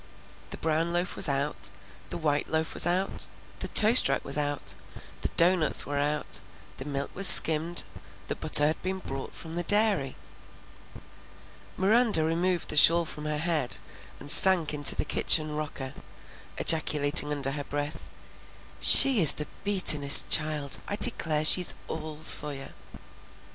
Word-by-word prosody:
The - - -11
brown 165 +1 -4
loaf 175 +1 -5
was - - -1
out, 140 +2 -1 0.4
the - - -7
white 150 -3 -5
loaf 160 0 -5
was - - -1
out, 185 +3 -5 0.3
the - - -7
toast 220 - +2
rack 135 - -5
was 140 - -6
out, 145 -9 -6 0.5
the - - -4
doughnuts 170 -2 0
were 145 0 -7
out, 150 +1 -5 0.4
the 130 - -11
milk 140 -1 -7
was 195 0 +4
skimmed, 165 0 +4 0.4
the - - -6
butter 145 - +2
had 155 +2 -4
been 190 +1 -7
brought 135 -7 -11
from 160 -1 -12
the 175 - -5
dairy. 205 -8 -1 1.6
Miranda 210 -3 0
removed 170 +2 -5
the - - -7
shawl 170 +3 +4
from 150 -1 -11
her 150 0 -6
head 155 -5 -3 0.4
and 145 - -2
sank 175 -5 +2
into 145 -1 +4
the - - -6
kitchen 155 -2 -2
rocker, 145 -3 -9 0.6
ejaculating 150 -2 +1
under 140 -2 -5
her 145 0 -8
breath, 145 +1 -9 0.7
"She 265 -7 +8
is 155 - +8
the 150 - -7 0.2
beatin'est 155 -8 +5
child! 150 -3 0
I 205 - -6
declare 160 -10 +1
she's 180 +3 +3
all 155 -1 -10
Sawyer!" 145 -3 +2
155 Hz, 150 wpm, -24 LUFS, 145-175 Hz, 1.6 s, She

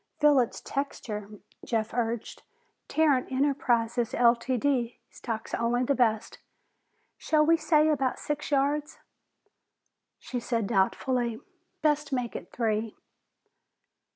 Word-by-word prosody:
"Feel 295 -2 +5
its 240 - -1
texture," 215 -7 -4 0.3
Jeff 225 -2 -2
urged. 230 -1 -2 0.5
"Tarrant 290 -5 +2
Enterprises, 245 -4 +1
Ltd., 245 +1 +2
stocks 225 -2 -6
only 240 +2 +1
the 280 - +2
best. 225 -4 0 0.8
Shall 305 -1 +3
we 330 +2 +5
say 310 -1 +3
about 275 -4 +1
six 295 0 -4
yards?" 290 +1 0 1.2
She 250 - -5
said 230 -2 -1
doubtfully, 235 +5 0 0.4
"Best 295 -1 +1
make 250 -3 -2
it - - -7
three." 220 -2 -1
250 Hz, 105 wpm, -28 LUFS, 230-285 Hz, 1.2 s, Feel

